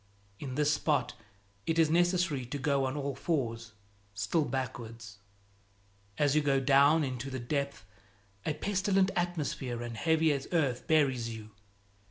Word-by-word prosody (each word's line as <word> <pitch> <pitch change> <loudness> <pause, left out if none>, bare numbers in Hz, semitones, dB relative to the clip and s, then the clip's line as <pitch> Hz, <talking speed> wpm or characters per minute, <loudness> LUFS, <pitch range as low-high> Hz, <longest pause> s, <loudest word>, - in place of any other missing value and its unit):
In 130 -3 -5
this 150 +1 +3
spot 145 -4 0 0.5
it 165 - +1
is 160 -2 +4
necessary 175 -4 +2
to 145 - -4
go 140 0 +1
on 130 +3 -2
all 140 -1 -2
fours, 115 -10 -2 0.4
still 100 +11 +1
backwards. 115 -5 -5 1.0
As 145 -1 +2
you 155 - +4
go 140 -2 +2
down 140 +4 +5
into 130 0 -4
the 130 -1 -4
depth, 140 -4 -3 0.6
a 155 - -1
pestilent 190 +2 +1
atmosphere 150 -9 -2
and 120 -1 -6
heavy 160 +4 +2
as 140 -1 -4
earth 140 -8 0
buries 135 -7 +2
you. 110 -1 -8
140 Hz, 145 wpm, -31 LUFS, 125-160 Hz, 1.0 s, down